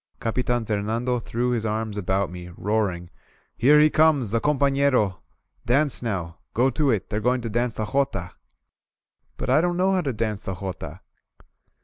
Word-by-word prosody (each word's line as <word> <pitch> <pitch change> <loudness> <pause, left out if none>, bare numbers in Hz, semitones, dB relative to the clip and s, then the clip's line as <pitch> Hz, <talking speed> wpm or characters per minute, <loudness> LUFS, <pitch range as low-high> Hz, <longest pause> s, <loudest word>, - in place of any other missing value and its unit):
Capitan 120 0 -1
Fernando 115 +4 -1
threw 120 +2 -2
his 120 -3 -1
arms 110 -1 -2
about 95 -1 -1
me, 90 -1 -8
roar 105 0 +1
ing: 85 -1 -8 0.4
"Here 145 +5 +5
he 155 0 +5
comes, 155 -8 +3
the 115 0 +1
companerol 140 -8 +2 0.4
Dance 140 +4 +2
now! 90 -8 -4 0.2
Go 130 +3 +3
to 150 -1 +1
it! 110 -5 -1
They're 105 - 0
going 125 +2 +1
to 115 -2 -5
dance 120 +1 0
the 110 - -2
jotaF* 135 +6 -1 1.0
*TBut - - -4
I 140 +5 +5
don't 175 0 0
know 190 +1 +2
how 185 - +2
to 140 -5 -1
dance 110 -3 -2
the 95 - -5
jota! 90 -3 -7
115 Hz, 170 wpm, -24 LUFS, 105-135 Hz, 1.0 s, Here